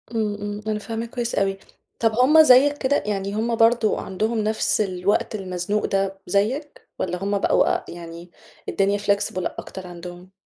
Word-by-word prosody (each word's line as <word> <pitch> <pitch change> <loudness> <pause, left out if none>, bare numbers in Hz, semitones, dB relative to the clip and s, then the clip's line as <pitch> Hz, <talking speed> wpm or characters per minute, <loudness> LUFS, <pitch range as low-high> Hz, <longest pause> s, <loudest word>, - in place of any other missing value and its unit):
امم، 215 -2 0
امم، 205 0 -5
أنا 215 -1 -1
فاهماك 225 +2 -5
كويِّس 240 -1 -3
أوي، 195 0 0 0.4
طب 225 -1 +3
همّ 275 +7 +6
زيَّك 285 +1 +6
كده؟ 285 0 +1
يعني 200 -1 -2
همّ 230 +2 0
برضو 225 -1 +3
عندهم 215 +5 -2
نفس 215 0 +1
الوقت 190 +2 0
المزنوق 190 +1 -2
ده 195 0 -1
زيَّك، 240 - -1
والَّا 180 0 -3
همّ 200 +1 0
بقوا - - +3
آآ، - - -4
يعني 170 0 -10 0.4
الدنيا 200 +1 +1
flexible 200 -2 0 0.2
أكتر 190 -1 -8
عندهم؟ 175 +1 -10
205 Hz, 160 wpm, -23 LUFS, 190-230 Hz, 0.4 s, همّ